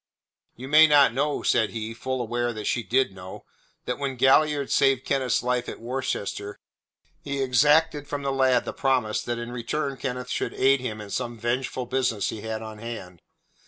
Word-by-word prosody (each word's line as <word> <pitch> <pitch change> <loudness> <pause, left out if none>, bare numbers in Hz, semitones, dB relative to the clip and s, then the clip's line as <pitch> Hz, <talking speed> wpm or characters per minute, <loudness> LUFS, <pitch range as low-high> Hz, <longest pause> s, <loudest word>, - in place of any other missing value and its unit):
"You 130 +3 -8
may 155 +3 +7
not 145 -5 +5
know," 145 +3 -1
said 110 -3 +2
he 110 0 -5
full 130 +3 -3
well 120 - -2
aware 120 +1 -1
that 110 -1 -6
she 120 - 0
did 125 -2 +1
know 95 0 -10 0.4
"that 125 - -3
when 140 -2 -2
Galliard 140 +2 +3
saved 135 -2 +3
Kenneth's 130 -4 0
life 125 0 -1
at - - -8
Worcester 115 -4 -4 0.7
he 140 -1 -3
exacted 145 +3 +3
from 145 -1 -4
the 140 - 0
lad 130 -1 +3
the - - -4
promise 130 -6 0
that 120 0 -3
in 120 0 -6
return 135 +3 -3
Kenneth 125 0 -4
should - - -2
aid 135 +1 +4
him 110 -4 -5
in 105 -1 -9
some 120 -2 -3
vengeful 125 +2 -2
business 125 -4 0
he 110 - -6
had 110 0 -4
on 110 -1 -9
hand." 100 -7 -8
125 Hz, 190 wpm, -25 LUFS, 115-135 Hz, 0.7 s, may